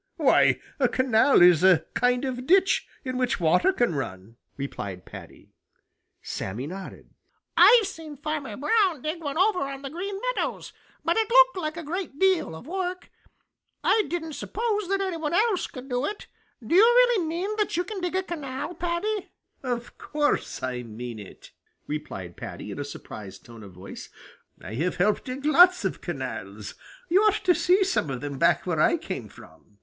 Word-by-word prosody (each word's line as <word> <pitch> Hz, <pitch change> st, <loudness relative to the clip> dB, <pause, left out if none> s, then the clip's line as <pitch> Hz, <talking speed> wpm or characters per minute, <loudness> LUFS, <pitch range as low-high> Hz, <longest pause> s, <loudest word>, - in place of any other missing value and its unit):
Why, -, -, +4 dB, 0.2 s
a 260 Hz, -, +4 dB
canal 250 Hz, -3 st, +4 dB
is 175 Hz, -2 st, +6 dB
a 180 Hz, -4 st, +5 dB
kind 250 Hz, +1 st, +1 dB
of 255 Hz, -1 st, -4 dB
ditch 380 Hz, +2 st, +3 dB, 0.2 s
in 255 Hz, -1 st, -3 dB
which 250 Hz, -4 st, 0 dB
water 175 Hz, -, +3 dB
can 240 Hz, -, +1 dB
run," 115 Hz, -6 st, -6 dB, 0.2 s
replied 100 Hz, -9 st, -6 dB
Paddy. -, -, -13 dB, 0.7 s
Sammy 105 Hz, +8 st, -4 dB
nodded. 185 Hz, +5 st, -9 dB, 0.4 s
"I've 470 Hz, -3 st, +7 dB
seen 320 Hz, -6 st, -8 dB
Farmer 295 Hz, -7 st, -4 dB
Brown 365 Hz, -, +1 dB
dig 315 Hz, +2 st, -3 dB
one 285 Hz, 0 st, -3 dB
over 380 Hz, +1 st, +3 dB
on 275 Hz, 0 st, -4 dB
the 275 Hz, -, -6 dB
Green 390 Hz, +4 st, -4 dB, 0.2 s
Meadows, -, -, -3 dB, 0.3 s
but 335 Hz, +3 st, +2 dB
it 445 Hz, 0 st, +1 dB
looked -, -, +6 dB
like 315 Hz, -2 st, -3 dB
a 335 Hz, -, -5 dB
great 330 Hz, -1 st, -5 dB
deal 375 Hz, -, +2 dB
of 160 Hz, -, -11 dB
work. 365 Hz, +2 st, -4 dB, 0.7 s
I 435 Hz, -, +3 dB
didn't 325 Hz, -2 st, -4 dB
suppose 425 Hz, +3 st, -2 dB
that 390 Hz, +1 st, 0 dB
any 375 Hz, -3 st, -2 dB
one 320 Hz, +1 st, -2 dB
else 420 Hz, -1 st, +2 dB
could 255 Hz, -1 st, -10 dB
do 250 Hz, -1 st, -1 dB
it. 415 Hz, -, -6 dB, 0.4 s
Do 220 Hz, -, -2 dB
you 370 Hz, -, +8 dB
really 480 Hz, -5 st, +5 dB
mean 360 Hz, +6 st, -2 dB
that 420 Hz, -5 st, 0 dB
you 355 Hz, -, +1 dB
can 390 Hz, +1 st, -6 dB
dig 360 Hz, 0 st, -2 dB
a 375 Hz, -, +1 dB
canal, 300 Hz, -3 st, -5 dB
Paddy?" 355 Hz, +5 st, -2 dB, 0.3 s
"Of 245 Hz, -2 st, -5 dB
course 295 Hz, 0 st, -1 dB
I 125 Hz, -1 st, -2 dB
mean 115 Hz, 0 st, -7 dB
it," 100 Hz, -, -13 dB, 0.3 s
replied 95 Hz, -, -6 dB
Paddy, -, -, -7 dB
in -, -, -7 dB
a -, -, -2 dB
surprised 95 Hz, -3 st, -10 dB
tone 115 Hz, -1 st, -12 dB
of 100 Hz, -3 st, -12 dB
voice. 90 Hz, +2 st, -10 dB, 0.5 s
"I -, -, -9 dB
have 165 Hz, +10 st, -1 dB
helped 205 Hz, +4 st, +1 dB
dig 265 Hz, +2 st, -6 dB
lots 360 Hz, +4 st, +6 dB
of -, -, -2 dB
canals. -, -, -6 dB, 0.3 s
You 375 Hz, +4 st, +4 dB
ought 425 Hz, -1 st, +2 dB
to 360 Hz, -, +6 dB
see 360 Hz, +3 st, +3 dB
some 370 Hz, -, 0 dB
of 130 Hz, -2 st, -4 dB
them 140 Hz, -2 st, -5 dB
back -, -, +3 dB
where -, -, -1 dB
I -, -, +4 dB
came -, -, -6 dB
from." 105 Hz, -, -17 dB
300 Hz, 180 wpm, -26 LUFS, -, 0.7 s, you